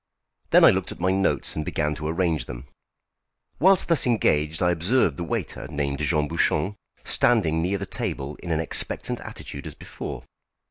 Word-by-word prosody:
Then - - +6
I - - +9
looked - - -2
at - - -9
my 95 - +2
notes, 95 0 0
and 75 - -2
began 75 -1 -1
to 75 0 -5
arrange 80 -1 0
them. 60 +1 -8 0.9
Whilst 190 +4 +5
thus 165 -6 +2
engaged 80 -9 +2
I 90 - +4
observed 85 - +2
the 85 - -4
waiter, 85 - -4
named 70 -2 -2
Jean 75 -1 +1
Bouchon, 90 +5 +1 0.3
standing 85 -10 +2
near 95 +4 0
the - - -5
table 70 +2 -3
in 90 - -9
an 80 - +1
expectant 80 - -2
attitude 70 - -8
as - - -8
before. - - -7
80 Hz, 175 wpm, -25 LUFS, 75-95 Hz, 0.9 s, I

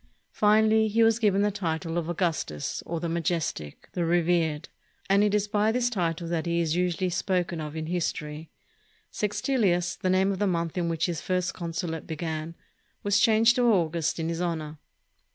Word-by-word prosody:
Finally, 220 +1 +4
he 225 +2 +3
was 225 0 +3
given 205 -3 +3
the. 210 - +2
title 165 -4 -3
of 170 -1 -2
"Augustus," 165 - -2
or 170 0 -2
the 170 - -3
"Majestic," 165 - -3
the 175 - -1
"Revered," 165 -2 +1 0.4
and 200 +1 +4
it 210 0 +2
is 210 0 +1
by 210 +1 +2
this 245 +1 0
title 170 -5 -1
that 170 0 -2
he 170 0 +1
is 165 -1 0
usually 180 0 0
spoken 175 -2 -1
of 150 0 -6
in 160 0 -3
history. 160 -2 -3 0.6
Sextilis, 205 -4 0
the 185 - -2
name 190 +1 +3
of 190 - -3
the 205 - +2
month 170 -3 -1
in 175 -2 -1
which 165 -1 0
his 170 -3 -3
first 185 0 -1
consulate 165 -2 -4
began, 160 0 -4 0.5
was 205 0 +3
changed 225 +2 +5
to 245 -1 +3
August 170 -4 +1
in 160 -1 -2
his 165 +1 -2
honor. 160 -3 -3
175 Hz, 180 wpm, -27 LUFS, 165-205 Hz, 0.6 s, changed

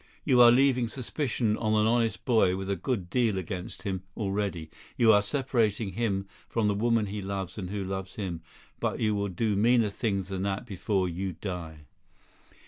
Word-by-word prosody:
You 125 -1 +5
are 120 - +10
leaving 125 -1 +4
suspicion 120 -2 -1
on 110 -1 +1
an 105 - +3
honest 115 0 +1
boy 110 -7 +3
with 95 +1 -3
a - - +1
good 105 -6 -2
deal 115 -1 +1
against 90 0 -5
him 95 -3 -2 0.2
already; 100 -6 -2 0.3
you 115 -2 +6
are 105 - +5
separating 115 -4 0
him 100 -1 -1 0.2
from 115 -2 +1
the 105 - +2
woman 115 +1 +2
he 105 +1 -5
loves 95 -2 -4
and 95 -4 -5
who 100 0 -3
loves 95 0 -5
him. 90 -6 -4 0.4
But - - -1
you 110 -1 +2
will 100 0 -1
do 105 +3 0
meaner 115 +1 +3
things 100 -4 -2
than 95 -1 -3
that 100 +2 -2
before 100 -2 -1
you 90 +2 -3
die." 80 -4 -6
100 Hz, 185 wpm, -28 LUFS, 95-115 Hz, 0.4 s, are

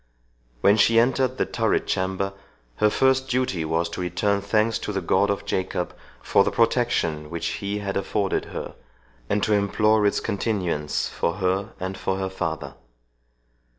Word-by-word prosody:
When 100 +2 +5
she 115 +2 +5
entered 130 +1 +2
the - - +1
turret - - 0
chamber, 95 +1 -1 0.4
her 105 - +4
first 130 +3 +2
duty 125 -10 0
was 80 +2 0
to 85 - -5
return 100 +3 0
thanks 110 +2 +1
to - - -4
the 100 - -1
God 95 +3 +2
of 100 0 -2
Jacob 95 -2 -2 0.3
for - - +4
the - - +1
protection 115 -10 +1
which 85 +1 -4 0.2
he 100 +1 -2
had 100 -1 -3
afforded 100 0 -1
her, - - -6 0.6
and 105 0 +1
to 110 - +2
implore 105 +1 +3
its - - +1
continuance 95 -8 -1
for 85 - -1
her 95 +3 -1
and 95 +1 -4
for 95 - -1
her 95 0 -3
father. 80 -4 -4
100 Hz, 160 wpm, -24 LUFS, 95-110 Hz, 0.6 s, When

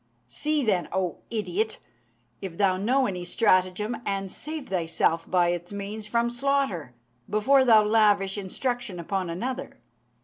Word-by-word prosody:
See, 300 - 0
then, 190 -5 +1
O 185 -3 -1
idiot! 215 0 -2 0.6
if 185 -4 -6
thou 195 -2 +3
know 250 +8 +2
any 180 -5 -3
stratagem, 185 +3 +1
and 195 -1 -3
save 305 -2 -6
thyself 165 -2 0
by 175 -2 +3
its 175 +1 -3
means 205 +1 -6
from 235 +2 +1
slaughter, 240 - -1 0.3
before 265 +6 +4
thou 225 -4 +6
lavish 210 -3 +3
instruction 215 +1 -3
upon 185 +1 -2
another. 245 +10 -4
205 Hz, 135 wpm, -26 LUFS, 185-235 Hz, 0.6 s, thou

